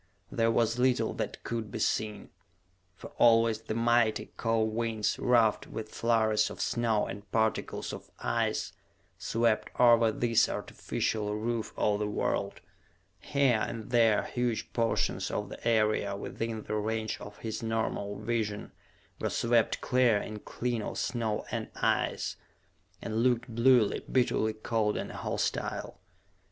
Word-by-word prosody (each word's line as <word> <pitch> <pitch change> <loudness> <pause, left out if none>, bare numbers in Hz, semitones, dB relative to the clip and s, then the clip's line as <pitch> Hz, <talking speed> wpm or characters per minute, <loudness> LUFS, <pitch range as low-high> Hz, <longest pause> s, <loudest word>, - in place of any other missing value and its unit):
There 115 0 +2
was 115 +1 +1
little 125 0 +2
that - - -5
could 115 -2 -3
be 115 - -4
seen, 110 -1 -1 0.6
for - - -11
always 115 -1 +5
the 110 -1 -4
mighty, 115 -1 +2
cold 110 -1 0
winds, 110 -2 -1
ruffed 115 -3 +3
with 110 -1 -6
flurries 110 -2 +2
of - - -9
snow 115 -3 +1
and 100 -1 -8
particles 110 -1 -1
of - - -9
ice, - - -1 0.5
swept 115 -1 +1
over 115 -2 +6
this 115 +1 +2
artificial 105 -1 -2
roof 115 +1 -2
of 105 -1 +1
the 105 - -1
world. 105 - -2 0.6
Here 135 +1 +2
and 115 -1 -5
there 115 -3 +4
huge 120 -2 -2
portions 115 -1 0
of - - -3
the - - -6
area 110 -3 +2
within 110 +2 -4
the 105 - -2
range 110 +1 -2
of 105 0 -9
his 110 0 -5
normal 110 -3 -2
vision 110 -3 -2 0.5
were - - -1
swept 115 -1 +1
clear 125 -4 +3
and 105 +1 -6
clean 120 -2 -2
of - - -5
snow 115 -4 -1
and - - -3
ice - - 0 0.7
and 110 -1 -3
looked 120 -1 +1
bluely, 120 -2 +4
bitterly 115 -3 +2
cold 110 -1 -1
and - - -4
hostile. - - -3
115 Hz, 140 wpm, -30 LUFS, 110-120 Hz, 0.7 s, over